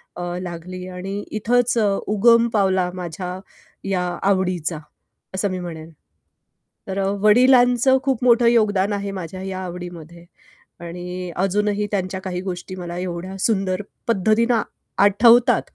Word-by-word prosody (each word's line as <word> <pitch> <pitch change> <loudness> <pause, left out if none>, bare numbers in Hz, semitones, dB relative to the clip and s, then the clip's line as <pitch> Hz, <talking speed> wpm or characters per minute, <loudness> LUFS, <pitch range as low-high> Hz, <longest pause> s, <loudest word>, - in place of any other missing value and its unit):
अ, 175 - -6 0.2
लागली 180 +1 -7
आणि 190 +2 -5
इथंच 240 +3 +1
अ, 215 -2 +3 0.2
उगम 230 +3 +4
पावला 190 -3 +2
माझ्या 180 +1 -5 0.5
या 185 -2 0 0.3
आवडीचा, 180 -4 0 0.6
असं 195 +1 0
मी 185 - -3
म्हणेन. 165 -2 -7 1.0
तर 190 +1 -3
अ, 195 - 0 0.2
वडिलांचं 250 +3 +5
खूप 265 -3 0
मोठं 235 -1 +5
योगदान 210 -4 +3
आहे 200 0 -3
माझ्या 185 +3 -7
या 190 -1 -5
आवडीमध्ये. 175 -1 -9 0.6
आणि 180 +1 -6
अजूनही 205 +2 0
त्यांच्या 190 -1 -2
काही 180 -1 -4
गोष्टी 185 0 -6
मला 175 -1 -6
एवढ्या 180 +1 -5
सुंदर 190 -2 0 0.3
पद्धतीनं 230 +2 +2 0.4
आठवतात 235 +4 +5
190 Hz, 125 wpm, -21 LUFS, 180-215 Hz, 1.0 s, वडिलांचं